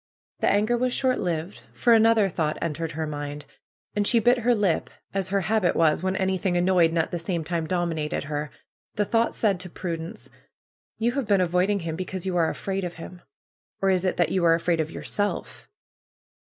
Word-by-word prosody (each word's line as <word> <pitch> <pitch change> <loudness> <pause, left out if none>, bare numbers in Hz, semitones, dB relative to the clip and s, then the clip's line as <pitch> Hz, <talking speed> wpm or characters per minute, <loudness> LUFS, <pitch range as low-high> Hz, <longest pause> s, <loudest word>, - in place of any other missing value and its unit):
The - - +2
anger 215 +4 +2
was 250 +1 0
short 260 -1 +1
lived. 170 +2 -3
For 240 - +3
another 225 -2 +5
thought 160 -4 -1
en 170 -2 -2
tered 160 +1 -4
her 160 +1 -2
mind. 145 -1 -5 0.5
And 205 -1 +1
she 240 - +4
bit 245 +2 +4
her 240 +1 +3
lip, 200 -6 0 0.2
as 195 -1 -1
her 200 0 +1
habit 215 -2 +1
was 160 -1 +3
when 185 +1 -1
anything 190 -1 0
annoyed 175 -2 +4
and 165 - -3
at 160 - 0
the 175 - -2
same 170 -1 -2
time 165 0 -2
domi 175 -1 0 0.2
nated - - -2
her. 150 0 -3 0.5
The 210 - +1
thought 230 +2 +1
said 200 -5 +1
to 180 0 -6
Prudence: 165 -1 -6 0.7
'^You 235 +2 +1
have 275 -4 -2
been 200 -2 +4
avoiding 185 +3 +1
him 165 -1 -3
because 185 +1 -5
you 185 -1 -1
are 165 -2 +3
afraid 195 0 -3
of 175 -1 -4
him. 175 +2 -10 0.6
Or 195 0 +2
fs 185 -1 +1
it 185 - 0
that 175 - +2
you 185 - +1
are 165 -1 +5
afraid 165 0 0
of 155 -1 -1
yourself? 205 +4 -3
180 Hz, 205 wpm, -25 LUFS, 165-205 Hz, 0.7 s, another